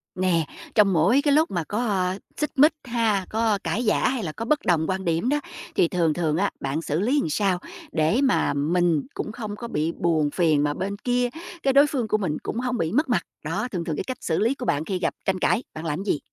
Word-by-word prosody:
Nè, 180 -4 +1 0.3
trong 205 -3 +5
mỗi 180 - +4
cái 290 0 +2
lúc 310 -2 +3
mà 175 -3 -1
có 195 -2 0 0.2
xích 300 - -1
mích 300 +3 +6
ha, 225 -5 +1
có 220 -1 +1
cãi 225 - -1
vã, 215 - +3
hay 255 -4 -2
là 160 - -3
có 225 +8 -6
bất 300 +5 +2
đồng 165 -3 +2
quan 190 0 -2
điểm 170 +8 +1
đó, 295 +1 +2 0.4
thì - - +4
thường 165 -3 +1
thường 160 -2 0
á, 200 +3 +1
bạn 140 +4 -2
xử 155 -1 -1
lý 250 +9 +2
làm - - -2
sao 185 +2 +1 0.3
để 160 - +2
mà 265 - +2
mình 165 +2 +1
cũng - - -4
không 215 -2 -6
có 235 - -7
bị 160 -6 -1
buồn 160 -4 +1
phiền, 155 -4 +2
mà 145 0 +1
bên 195 +5 -3
kia 245 0 +1 0.3
cái 270 - +3
đối 280 +2 +6
phương 260 -6 -2
của 215 - +2
mình 170 -8 -2
cũng 230 - -3
hông 250 0 -1
bị 165 -4 -1
mất 295 - +1
mặt? - - +2 0.2
Đó, - - -1
thường 180 -3 -2
thường 160 - -2
cái - - -2
cách 255 +5 -5
xử 160 - 0
lý 235 +5 +2
của 255 - -6
bạn 150 -7 0
khi 190 0 -2
gặp - - 0
tranh 190 -1 0
cãi, 225 +6 +2
bạn 155 +1 -7
làm 160 +4 -2
gì? 195 -7 0
190 Hz, 250 wpm, -24 LUFS, 165-240 Hz, 0.4 s, mích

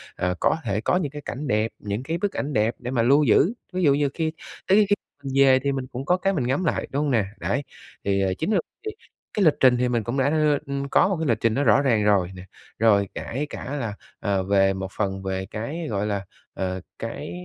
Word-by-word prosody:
à, 90 0 0
có - - +3
thể 105 -1 -1
có 180 - +2
những 150 -7 -2
cái 145 0 -7
cảnh 140 +4 -5
đẹp, 110 -1 +1
những 105 +4 -4
cái 165 +4 -2
bức 200 +2 -1
ảnh 145 +1 -3
đẹp 110 +1 +1
để 125 0 -5
mà 120 -3 +1
lưu 140 +5 +5
giữ. 165 - +4 0.2
Ví 185 -1 -1
dụ 140 -2 +5
như 145 -1 +1
khi 160 -2 -1 0.4
tới 205 +2 +5
kh - - +5 0.3
mình 135 -1 -4
về 130 -1 +6
thì 140 +1 -1
mình 135 -1 -3
cũng 130 +3 -6
có 180 +2 +3
cái 195 +1 0
mình 130 -8 -1
ngắm 135 +8 0
lại, 160 - 0
đúng 140 +2 0
hông 145 - 0
nè? 110 -5 +2
Đấy. 140 - -1 0.4
Thì, 100 0 +1
ờ, 95 -1 +1
chính 180 +7 -1
là 195 - +3 0.2
đi 430 - -3 0.4
cái 200 -4 +2
lịch 155 - +6
trình 125 -2 +5
thì 125 0 +1
mình 120 -3 0
cũng 120 +5 -3
đã 135 +1 +3
đưa 150 -2 +3 0.3
có - - +5
một 195 -4 0
cái 160 - -1
lịch 115 - +2
trình 115 -1 +2
nó 140 - +1
rõ 130 +3 +5
ràng 115 -6 +2
rồi 100 -3 +3
nè. 90 - -9 0.4
Rồi 100 -3 +4
kể 140 +6 -3
cả 140 - -5
là, 110 -4 -3 0.3
ờ, 100 -3 0
về 95 0 +3
một 95 0 -4
phần 95 -2 -2
về 95 0 -2
cái, 140 - -5
gọi 100 -1 -1
là, 100 -1 -2 0.3
ờ, 95 -1 -3 0.2
cái - - -5
125 Hz, 255 wpm, -24 LUFS, 105-150 Hz, 0.4 s, về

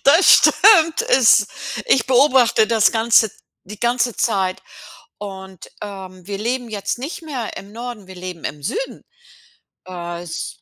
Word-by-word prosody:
das 320 +7 +6
stimmt, 330 -6 +5
es 220 -5 +5 0.4
ich 265 - +2
beobachte 255 -4 +3
das 225 -1 +2
Ganze 225 -1 +3 0.3
die 210 +2 -11
ganze 240 0 0
Zeit 190 -5 -1 0.6
und, 190 -3 -10
ähm, 190 -3 -10
wir 200 -1 -5
leben 240 +3 -3
jetzt 205 +1 -4
nicht 290 +6 -7
mehr 270 -8 -6
im 200 +1 -10
Norden, 235 -3 -8
wir 190 - -12
leben 180 -2 -9
im 145 0 -6
Süden. 470 - -5 0.8
Äh, 175 -2 -7
es 170 -2 -7
220 Hz, 140 wpm, -19 LUFS, 190-250 Hz, 0.8 s, das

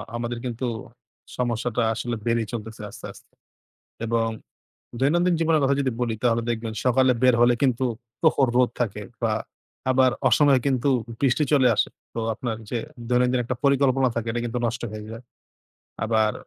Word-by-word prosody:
আমাদের 120 0 -3
কিন্তু 120 +1 -3 0.7
সমস্যাটা 120 -1 -1
আসলে 120 +1 -3
বেড়েই 115 -2 +1
চলতেছে 110 -1 -6
আস্তে, - - -11
আস্তে। - - -19 0.7
এবং 115 0 +1 0.7
দৈনন্দিন 175 +6 +3
জীবনের 160 -1 +3
কথা 140 - +3
যদি 135 -2 +1
বলি 120 -2 0
তাহলে 115 -1 +2
দেখবেন 115 -1 -3
সকালে 130 +1 +4
বের 125 -1 +6
হলে 120 0 +5
কিন্তু 130 -1 +2 0.4
প্রখর 145 -5 +3
রোদ 125 -1 +4
থাকে 105 -3 -1 0.2
বা 115 -2 +2 0.6
আবার 130 0 +4 0.2
অসময়ে 135 +2 +5
কিন্তু 130 0 +1 0.3
বৃষ্টি 140 +2 +2
চলে 130 -4 +5
আসে। - - +2 0.3
তো - - -4 0.2
আপনার 115 -1 -3
যে, 120 - -1 0.3
দৈনন্দিন 125 0 +2
একটা 125 +1 -3
পরিকল্পনা 135 -1 +3
থাকে 115 -1 -2
এটা 120 +1 -2
কিন্তু 120 +1 -2
নষ্ট 115 +1 -3
হয়ে 105 0 -7
যায়। 115 +2 -8 0.8
আবার 110 -1 +2
125 Hz, 155 wpm, -24 LUFS, 115-130 Hz, 0.8 s, বের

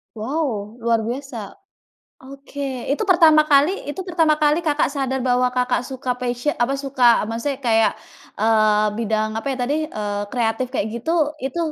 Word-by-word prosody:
Wow, 225 -3 -3
luar 230 -1 +1
biasa. 240 -2 -6 0.7
Oke 275 +1 -12 0.3
itu 295 - 0
pertama 320 -3 +6
kali 285 +4 +5 0.2
itu 375 - -6
pertama 325 -3 +3
kali 300 +2 +4
Kakak 295 0 +2
sadar 265 -1 -1
bahwa 250 0 +2
Kakak 250 0 +1
suka 260 -1 -4
passio 245 +3 -1
apa 270 +3 +1
suka 275 -2 -5 0.3
maksudnya 260 +4 -3
kayak, 225 -2 +3 0.5
eee, 215 -1 +3
bidang 215 -1 0
apa 250 - -8
ya - - -8
tadi, 285 +5 0
eee, 205 -1 -3
kreatif 240 +1 -1
kayak 235 -5 -1
gitu 240 +8 -4 0.3
itu 270 +6 -3
250 Hz, 155 wpm, -21 LUFS, 225-285 Hz, 0.7 s, pertama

